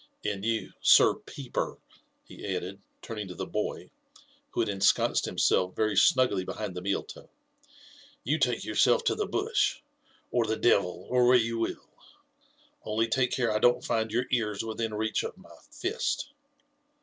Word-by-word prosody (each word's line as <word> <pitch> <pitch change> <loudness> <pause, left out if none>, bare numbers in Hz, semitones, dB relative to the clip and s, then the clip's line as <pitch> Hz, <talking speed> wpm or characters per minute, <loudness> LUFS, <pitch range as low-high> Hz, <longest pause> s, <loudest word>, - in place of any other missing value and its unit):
And 100 -2 -2
you. 115 0 -2
Sir - - +7
Peeper," - - -5 0.5
he - - -13
added, 95 +2 -6 0.2
taming 105 -3 -5
to 90 - -8
the - - -4
boy, - - -4 0.6
who - - -1
had 115 - 0
ensconced 100 -1 +2
himself 90 0 +1
very 110 -1 0
snugly 100 -1 +4
behind 95 - -5
the 90 - -6
tneaMub, 100 +1 -4 0.9
"you 155 - 0
take 125 -4 0
yourself 110 - +3
to - - +2
the - - -2
bush, - - 0 0.5
or 120 -2 +1
the 110 0 -1
devil, 90 -6 +2
or 125 -1 +4
where 125 0 +7
you 115 -1 -1
will,— 115 - -3 1.0
only 110 +1 0
take 125 +2 +1
care 120 -3 0
I 105 - +1
don't 120 +2 +3
find 115 -1 0
your 120 +3 0
ears 110 -4 0
within 115 0 -3
reach 110 +1 0
of 455 - -6
my - - -16
fiat.' 390 -1 -2
110 Hz, 160 wpm, -28 LUFS, 100-120 Hz, 1.0 s, Sir